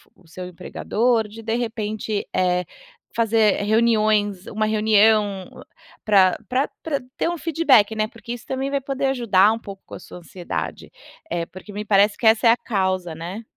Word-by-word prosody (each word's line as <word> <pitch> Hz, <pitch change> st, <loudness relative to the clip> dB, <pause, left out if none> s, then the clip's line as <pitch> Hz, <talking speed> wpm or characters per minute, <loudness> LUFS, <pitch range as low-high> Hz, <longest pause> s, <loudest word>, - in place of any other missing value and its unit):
o 180 Hz, -, -24 dB
seu 180 Hz, +3 st, -8 dB
empregador. 220 Hz, +6 st, -1 dB
De 225 Hz, +1 st, -4 dB
repente, 220 Hz, -3 st, -3 dB
eh, 180 Hz, -1 st, +1 dB, 0.5 s
fazer 220 Hz, -3 st, +2 dB
reuniões, 215 Hz, -3 st, +2 dB
uma 215 Hz, 0 st, -1 dB
reunião 215 Hz, -2 st, +2 dB, 0.5 s
pra 190 Hz, -4 st, +4 dB
pra 260 Hz, +3 st, +1 dB, 0.2 s
pra 295 Hz, -4 st, -1 dB, 0.2 s
ter -, -, 0 dB
um 345 Hz, -, -3 dB
feedback, 290 Hz, -10 st, +3 dB
né, 215 Hz, 0 st, 0 dB
porque 235 Hz, +1 st, -8 dB
isso 240 Hz, -, -9 dB
também 265 Hz, +1 st, -2 dB
vai 280 Hz, -, 0 dB
poder 275 Hz, 0 st, -3 dB
ajudar 220 Hz, -6 st, +3 dB
um 225 Hz, -, -5 dB
pouco 200 Hz, -3 st, -11 dB
com -, -, -15 dB
a -, -, -9 dB
sua -, -, -12 dB
ansiedade. 175 Hz, 0 st, -6 dB, 0.4 s
É 170 Hz, -1 st, -2 dB
porque 185 Hz, +4 st, -12 dB
me 210 Hz, +1 st, -5 dB
parece 205 Hz, 0 st, +3 dB
que -, -, -5 dB
essa 225 Hz, +1 st, +5 dB
é -, -, +8 dB
a 235 Hz, -, +3 dB
causa, 190 Hz, -6 st, -2 dB
né. 175 Hz, +7 st, -7 dB
215 Hz, 175 wpm, -22 LUFS, 195-230 Hz, 0.5 s, é